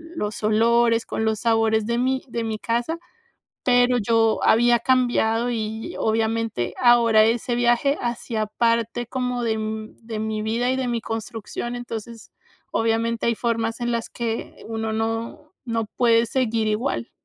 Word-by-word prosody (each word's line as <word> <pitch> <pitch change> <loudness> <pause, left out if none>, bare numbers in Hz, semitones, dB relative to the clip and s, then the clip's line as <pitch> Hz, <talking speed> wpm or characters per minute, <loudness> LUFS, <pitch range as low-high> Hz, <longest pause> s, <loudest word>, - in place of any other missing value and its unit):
los 210 -7 -4
olores, 230 +2 +3
con 220 - -2
los 220 -1 0
sabores 225 -2 +2
de 235 +1 -1
mi 260 +1 +1
de 235 0 -3
mi 220 -1 -3
casa, 240 +10 -1 0.6
pero 245 0 +4
yo 225 0 +2
había 240 +1 +4
cambiado. 240 -1 +2
Y, 220 -1 -4
obviamente, 220 - -1
ahora 235 -3 +6
ese 235 +2 0
viaje 245 +4 +2
hacía 235 -2 -2
parte 230 +1 0
como 250 -1 -2
de, 220 -1 0
mm, 220 0 -5
de 225 -1 -5
mi 215 0 -2
vida 230 +3 0
y - - 0
de 260 -1 -1
mi 235 -1 -1
construcción. 225 +2 -5
Entonces, 230 -2 -7 0.4
obviamente 225 0 0
hay 235 - +2
formas 230 0 -1
en 240 - 0
las 230 -1 -2
que 230 -1 -5
uno 225 -1 -3
no 225 +7 -3
no 230 -2 -1
puede 230 -1 +4
seguir 230 -3 0
igual. 230 +3 -1
230 Hz, 155 wpm, -23 LUFS, 220-240 Hz, 0.6 s, ahora